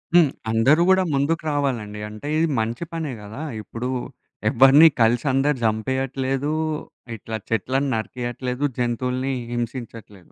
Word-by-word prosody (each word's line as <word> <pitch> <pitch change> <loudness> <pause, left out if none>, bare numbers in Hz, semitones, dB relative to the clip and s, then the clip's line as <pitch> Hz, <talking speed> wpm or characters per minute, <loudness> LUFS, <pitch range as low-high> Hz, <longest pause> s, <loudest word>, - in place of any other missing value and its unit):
హ్మ్. 165 -6 +6 0.2
అందరూ 135 +9 +4
గూడా 190 0 +5
ముందుకు 150 +4 0
రావాలండి. 120 -8 -2
అంటే 105 +7 -8
ఇది 165 +1 +3
మంచి 115 +7 -2
పనే 160 -4 -3
గదా! 105 +7 -8 0.2
ఇప్పుడు 115 +5 -5 0.6
ఎవ్వరిని 135 +5 +7
కలిసందరూ 135 +5 +2
జంపేయట్లేదు. 130 +5 -1 0.6
ఇట్లా 110 +1 -5
చెట్లను 130 +5 0
నరికియట్లేదు. 125 +3 -4
జంతువుల్ని 125 +2 -1 0.2
హింసించట్లేదు. 115 -5 -6
130 Hz, 110 wpm, -23 LUFS, 115-140 Hz, 0.6 s, ఎవ్వరిని